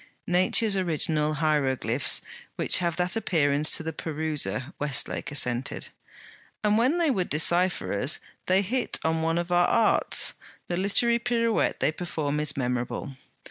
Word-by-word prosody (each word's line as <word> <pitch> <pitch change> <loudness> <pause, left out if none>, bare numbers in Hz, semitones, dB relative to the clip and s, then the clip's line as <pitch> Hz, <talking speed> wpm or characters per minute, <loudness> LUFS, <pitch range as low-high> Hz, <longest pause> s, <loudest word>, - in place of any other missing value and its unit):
'Nature's 185 +4 +2
original 155 -4 0
hieroglyphs 135 -5 +1 0.3
which - - +2
have 170 -2 -1
that 180 +3 -1
appearance 150 -8 +1
to - - -7
the 160 0 -4
peruser,' 150 - -3
Westlake 145 -2 -1
assented. 125 -3 -1 0.7
'And 210 0 +3
when 255 +9 +2
they 335 -4 +2
would 185 -8 -1
decipher 175 +4 +1
us, 130 +9 +2
and - - -13 0.2
they 185 +1 +3
hit 245 +6 -1
on 160 0 0
one 165 +1 0
of 175 +1 -3
our 175 0 +4
"arts," 225 -2 +2 0.4
the 175 - -1
literary 235 +5 +2
pirouette 230 -2 0
they - - +2
perform 155 -3 -3
is 150 -2 +1
memorable.' 125 +1 -3
160 Hz, 145 wpm, -26 LUFS, 145-190 Hz, 0.7 s, our